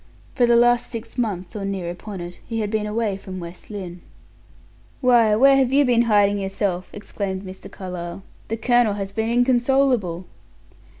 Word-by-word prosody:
For 245 -2 +3
the 235 - +5
last 240 0 +4
six 230 -1 -7
months 205 -6 -3
or 205 - -4
near 190 -3 -3
upon 190 +1 -8
it, 175 0 -8
he 225 -1 -3
had 210 -1 -3
been 215 -1 -1
away 210 -2 -1
from 190 -1 -8
West 170 0 -10
Lynne. 180 -4 -7 1.0
"Why, 235 -4 +4
where 275 +5 +6
have 265 -2 +2
you 280 +1 +4
been 240 -2 +3
hiding 205 -1 +3
yourself?" 195 -2 -2
exclaimed 200 -2 -5
Mr. 185 -1 -10
Carlyle. 180 -1 -7 0.2
"The 225 - -3
colonel 240 -1 +3
has 195 -1 -4
been 220 +2 -2
inconsolable." 245 -6 +2
210 Hz, 170 wpm, -22 LUFS, 190-240 Hz, 1.0 s, where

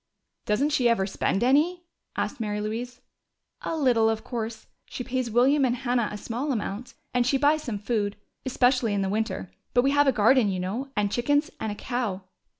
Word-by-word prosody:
"Doesn't 250 +9 +2
she 255 -5 +3
ever 195 -5 +2
spend 195 +1 -1
any?" 310 +8 +3 0.3
asked - - -2
Mary 210 -2 -2
Louise. 235 +4 -4 0.6
"A 325 - -3
little, 240 -6 +3
of 220 0 -2
course. 225 -2 -5 0.2
She 250 - -5
pays 255 -1 -2
William 260 +5 +4
and 245 -2 +2
Hannah 245 -3 0
a 210 - -5
small 245 +7 -3
amount, 220 0 -4 0.2
and 245 -1 +3
she 255 +3 +2
buys 295 +3 +3
some 235 -7 -4
food, 205 -1 -1 0.3
especially 250 -4 +2
in 195 -1 0
winter. 220 -3 -2 0.2
But 245 - +5
we 275 - +3
have 290 0 +4
a - - +6
garden, 230 0 +4
you 185 -1 -2
know, 215 +10 -3
and 205 -1 +1
chickens 290 +6 +1
and 220 - -2
a - - -5
cow." 220 -6 -3
240 Hz, 190 wpm, -26 LUFS, 210-265 Hz, 0.6 s, a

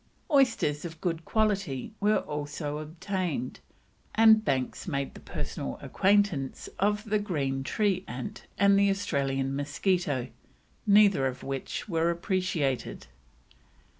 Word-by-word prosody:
Oysters 225 - +3
of 165 -2 -7
good 165 -3 -2
quality 200 - 0
were 210 +1 +3
also 150 0 -4
obtained, 165 -4 -3 0.6
and 220 -1 +7
Banks 130 -5 -1
made 140 -5 -2
the - - -11
personal - - -5
acquaintance 195 -9 +1
of 210 +1 +1
the 215 -1 0
green 140 -10 -1
tree 195 +3 0
ant 125 0 -7
and 200 0 +5
the 200 0 +4
Australian 135 -8 -1
mosquito, 145 -1 0 0.6
neither 200 -9 +6
of 130 0 -5
which 135 +7 -4
were 165 -3 +1
appreciated. 170 - -1
170 Hz, 115 wpm, -28 LUFS, 140-200 Hz, 0.6 s, and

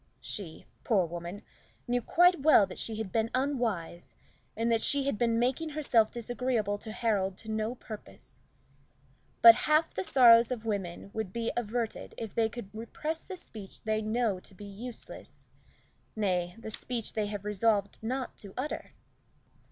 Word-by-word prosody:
She, 180 -7 -7 0.2
poor 200 -6 +3
woman, 175 +4 -7 0.4
knew 245 0 +1
quite 355 +7 +4
well 285 -8 +7
that 190 - -9
she 225 - -2
had 215 -3 -4
been 225 0 +1
unwise, 235 - -2 0.4
and 230 +1 +1
that 225 -1 +3
she 280 -1 +3
had 275 -3 0
been 230 +1 +1
making 260 +7 0
herself 275 -8 +2
disagreeable 235 -3 -1
to 220 - -7
Harold 200 -5 0
to 220 - -6
no 220 +2 -1
purpose. 170 - -11 1.0
But 230 -1 +12
half 305 +7 +2
the 185 - -2
sorrows 235 -1 +7
of 240 -3 -4
women 195 -3 -3
would 220 -4 -3
be 230 +2 -2
averted 235 0 -3
if 225 -3 -6
they 225 -2 +2
could 215 -3 -9
repress 300 +9 -4
the 375 - -8
speech 210 - -10
they 215 0 0
know 215 -2 0
to 190 - -14
be 205 - -10
useless 225 +4 -8 0.7
nay, 180 -4 0
the 225 -1 -7
speech 235 0 -4
they 215 -2 -1
have 205 -1 -5
resolved 210 -1 +1
not 255 +3 -3
to 200 -2 -9
utter. 270 +4 -4
220 Hz, 160 wpm, -30 LUFS, 205-245 Hz, 1.0 s, But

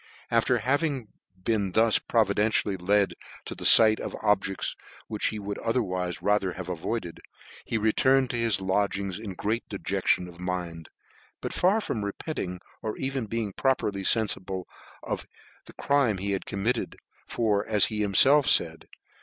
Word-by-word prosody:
After 115 +2 +2
having 135 0 -1 0.3
been 100 -4 -1
thus 110 0 +4
providentially 105 -2 +1
led 100 +2 +1 0.3
to - - -5
the - - -7
fight 110 -1 +8
of - - -5
objects 95 -2 0 0.3
which 105 -2 -1
he 110 - -3
wouldotherwife 100 -3 -2
rather 100 -3 +1
havcavoid 90 +5 -4
ed, 85 - -10 0.5
he 115 - -1
returned 130 +4 +2
to - - -4
his 115 -5 0
lodgings 100 0 -1
in 105 -4 -7
great 110 +5 -3
dejection 90 - -1
of 85 -1 -13
mind, 90 -3 -5 0.5
but - - -5
far 190 +5 +2
from 110 - -3
repenting 100 - -5 0.2
or 110 -1 -4
even 135 -3 -3
being 110 -2 -3
properly 105 -7 0
fenfible 95 -3 +1 0.4
of - - -4 0.4
the - - -12
crime 140 -8 +1
he 100 +2 -3
had 95 - -3
committed; 110 +5 -2 0.3
tor, 105 -4 0
as 105 -2 +3
he 110 - -4
himfelf 130 +8 +5
faid 80 -1 +2
105 Hz, 145 wpm, -26 LUFS, 95-115 Hz, 0.5 s, fight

